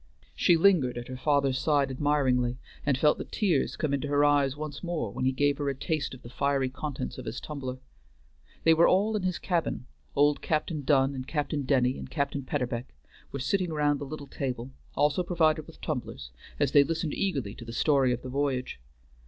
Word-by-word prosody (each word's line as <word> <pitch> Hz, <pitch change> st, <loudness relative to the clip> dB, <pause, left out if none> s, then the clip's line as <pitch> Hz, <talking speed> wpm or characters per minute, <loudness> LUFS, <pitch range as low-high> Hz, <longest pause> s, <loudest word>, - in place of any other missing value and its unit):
She 170 Hz, -, +4 dB
lingered 160 Hz, -9 st, +4 dB
at 120 Hz, +1 st, -6 dB
her 130 Hz, -, -5 dB
father's 135 Hz, 0 st, +1 dB
side 145 Hz, -3 st, +2 dB
admiringly, 130 Hz, -3 st, +1 dB, 0.3 s
and 140 Hz, -2 st, +3 dB
felt 150 Hz, +2 st, +3 dB
the -, -, -2 dB
tears 180 Hz, -, 0 dB
come 150 Hz, -3 st, -1 dB
into 140 Hz, +1 st, -1 dB
her 145 Hz, 0 st, +3 dB
eyes 145 Hz, -1 st, +3 dB
once 150 Hz, 0 st, -6 dB
more 165 Hz, -, -2 dB
when 130 Hz, -, -3 dB
he 130 Hz, -, +3 dB
gave 145 Hz, +2 st, +1 dB
her 145 Hz, -1 st, 0 dB
a 135 Hz, -, -2 dB
taste 140 Hz, +1 st, -2 dB
of 125 Hz, -, -16 dB
the 120 Hz, -, -9 dB
fiery 140 Hz, -1 st, +1 dB
contents 130 Hz, -, -5 dB
of -, -, -8 dB
his -, -, -4 dB
tumbler. 130 Hz, -4 st, -5 dB, 0.9 s
They 165 Hz, -, +6 dB
were 165 Hz, +1 st, +5 dB
all 210 Hz, +4 st, +3 dB
in 210 Hz, -, 0 dB
his 185 Hz, -1 st, -1 dB
cabin; 170 Hz, -8 st, -1 dB, 0.3 s
old 145 Hz, +1 st, +3 dB
Captain 155 Hz, 0 st, -1 dB
Dunn 135 Hz, -1 st, +3 dB
and 130 Hz, -1 st, -6 dB
Captain 150 Hz, -2 st, -2 dB
Denny 130 Hz, -1 st, +2 dB
and -, -, -8 dB
Captain 140 Hz, -2 st, -1 dB
Peterbeck 125 Hz, -2 st, -3 dB, 0.4 s
were -, -, -4 dB
sitting 180 Hz, +6 st, 0 dB
round 145 Hz, -2 st, +1 dB
the 145 Hz, -, -5 dB
little 145 Hz, +1 st, -7 dB
table, 130 Hz, -2 st, -4 dB, 0.2 s
also 145 Hz, +4 st, +2 dB
provided 160 Hz, -3 st, +1 dB
with 165 Hz, -, -14 dB
tumblers, 120 Hz, -, -4 dB, 0.3 s
as 145 Hz, -2 st, +2 dB
they 145 Hz, -, +7 dB
listened 160 Hz, 0 st, -2 dB
eagerly 140 Hz, -, -1 dB
to 120 Hz, -, -10 dB
the 115 Hz, -, -7 dB
story 135 Hz, +1 st, +3 dB
of 125 Hz, -, -2 dB
the 130 Hz, -, -6 dB
voyage. 130 Hz, -, -1 dB
140 Hz, 200 wpm, -28 LUFS, 130-155 Hz, 0.9 s, they